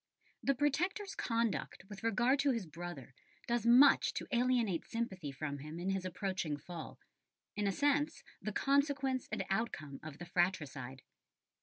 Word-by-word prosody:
The 275 - +2
Protector's 355 - 0
conduct 230 -4 -1
with 205 -1 -9
regard 240 +5 +3
to 285 - +3
his 230 -7 0
brother 165 -5 -8 0.3
does 235 -1 0
much 260 +4 +7
to - - -3
alienate 240 -7 +2
sympathy 190 -10 -3
from 145 +1 -4
him 150 +3 -7
in 185 +2 -1
his 190 -1 -2
approaching 185 -4 -2
fall, 160 +2 -8 0.6
in 210 -1 0
a - - +3
sense 290 +5 +1 0.2
the 215 - -3
consequence 275 0 +1
and - - -2
outcome 155 -10 -2
of 155 -2 -8
the 175 - -7
fratricide. 150 -8 -1
205 Hz, 150 wpm, -35 LUFS, 165-255 Hz, 0.6 s, much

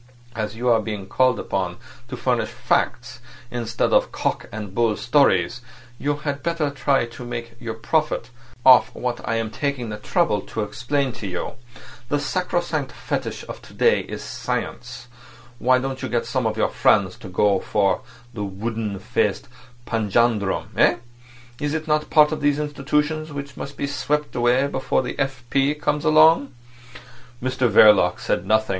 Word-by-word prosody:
As 110 -1 -3
you 120 +2 -3
are 115 -2 +4
being 105 -3 -5
called 130 +2 +2
upon 90 -2 -2 0.3
to - - -6
furnish - - 0
facts 125 +2 -1 0.3
instead 115 -1 -1
of - - +3
cock - - -2
and 105 -3 -6
bull 115 -1 +1
stories, 120 -5 +2 0.4
you 145 +1 0
had 145 -1 -4
better 160 -2 -1
try 135 -2 +1
to 120 +1 -10
make 120 -1 -6
your 115 -2 -5
profit 140 0 -1 0.3
off 130 -1 +7
what 125 -1 -3
I 115 - +1
am 115 -1 -2
taking 130 -1 -2
the 105 - -5
trouble 135 - +1
to 110 - -4
explain 130 +6 -1
to 110 -3 -6
you. 90 -2 -4 0.6
The 145 - +2
sacrosanct 165 -3 -1
fetish - - -4
of - - -8
to - - -15
day - - +4
is - - -7
science. - - -4 0.5
Why 130 +1 +4
don't 130 0 -3
you - - -3
get 120 - 0
some 130 -4 -1
of 110 0 -2
your - - +2
friends 95 -4 +3
to - - -10
go 100 +1 +2
for 100 -1 +1 0.3
that 105 - -5
wooden 105 +1 -3
faced 95 - -1 0.4
panjandrum—eh? 110 -2 +1 0.6
Is 150 +1 -1
it 160 0 -3
not 150 0 +1
part 150 -1 +5
of 155 - -3
these 145 0 +2
institutions 150 +1 -1
which 140 -1 -7
must 140 0 -7
be - - -1
swept 150 +1 -1
away 125 +2 +3
before 130 -1 0
the 125 - -6
F. 135 -3 -2
P. 140 +2 +2
comes 150 0 -1
along?" 155 -3 +5 0.8
Mr 130 0 0
Verloc 105 0 +6
said 90 +2 -1
nothing. 110 +1 +2
125 Hz, 165 wpm, -22 LUFS, 110-145 Hz, 0.8 s, off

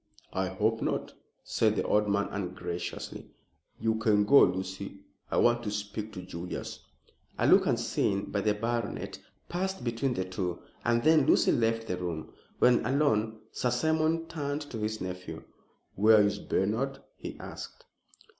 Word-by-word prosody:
"I 95 0 0
hope 110 +4 0
not," - - -2 0.3
said - - +2
the - - 0
old 105 0 +2
man 100 0 +1
ungraciously. 90 -2 -5 0.5
"You 110 0 +1
can 105 -2 +3
go, 140 +7 +8
Lucy. 95 +2 0 0.3
I - - -1
want 120 0 +4
to 110 - -3
speak 105 +1 -4
to 90 -2 -7
Julius." 90 -1 -6 0.6
A - - +1
look, - - +6
unseen 100 0 0
by 100 - 0
the 105 +1 +2
baronet, 115 0 -3 0.3
passed 190 0 -2
between 120 +2 -1
the 95 - -1
two, 90 -1 -3 0.3
and 120 0 +2
then 155 -3 +5
Lucy - - +5
left 115 -1 +1
the 90 -5 -2
room. 85 -3 -5 0.2
When 125 -1 +5
alone, 110 -6 +1
Sir 125 - 0
Simon 160 +5 +1
turned 150 -3 -3
to 115 - -4
his 110 +1 -2
nephew. 90 -3 -6 0.5
"Where 105 +1 +6
is 100 0 0
Bernard?" 115 +8 0 0.2
he - - -7
asked. - - -9
110 Hz, 155 wpm, -29 LUFS, 95-120 Hz, 0.6 s, go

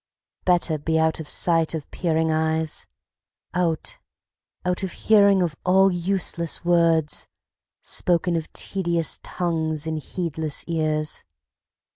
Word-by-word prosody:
Better 175 -3 +2
be 160 +2 -1
out 160 0 +1
of 155 - -6
sight 165 -2 +3
of 155 -3 -7
peering 160 -2 0
eyes; 160 0 -1 0.7
Out 175 -3 -1 0.7
out 180 +1 +1
of 190 -3 -3
hearing 200 -3 +4
of 165 -4 -2
all 190 +1 +4
useless 175 -2 +1
words, 165 -3 +2 0.5
Spoken 175 0 +1
of 160 -2 -4
tedious 170 -5 0
tongues 160 -3 -2
in 160 -1 -2
heedless 160 -1 -3
ears. 155 -2 -1
165 Hz, 115 wpm, -23 LUFS, 160-180 Hz, 0.7 s, hearing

